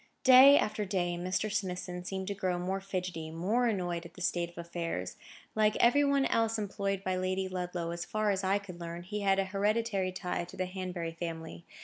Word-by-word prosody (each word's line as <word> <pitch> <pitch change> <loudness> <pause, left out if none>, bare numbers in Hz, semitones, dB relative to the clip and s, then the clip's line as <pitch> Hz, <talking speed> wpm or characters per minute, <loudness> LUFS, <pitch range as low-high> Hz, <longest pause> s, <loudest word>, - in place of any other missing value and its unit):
Day 265 +2 +9
after 210 0 0
day 180 -3 -1
Mr. 185 +4 -1
Smithson 180 -3 -3
seemed 190 +1 -4
to - - -1
grow 185 -2 -1
more 190 +2 -2
fidgety, 180 -4 -4
more 200 +10 +1
annoyed 175 -6 -1
at 170 -1 -12
the 180 - -10
state 175 -1 0
of 175 - -20
affairs. 170 - -4 0.4
Like 215 0 +3
every 245 +5 +5
one 280 -1 +3
else 225 -2 +1
employed 200 -2 -2
by 185 -1 0
Lady 185 +1 -1
Ludlow, 180 -2 -3
as 170 0 -4
far 215 +1 0
as 195 0 -1
I 190 +1 +3
could 190 -4 -9
learn, 170 0 -6
he 205 +4 -4
had 195 -1 +3
an 195 - +2
hereditary 200 0 0
tie 180 -1 -3
to 175 - -12
the 185 - 0
Hanbury 180 -2 -4
family. 165 0 -6
185 Hz, 205 wpm, -31 LUFS, 175-205 Hz, 0.4 s, Day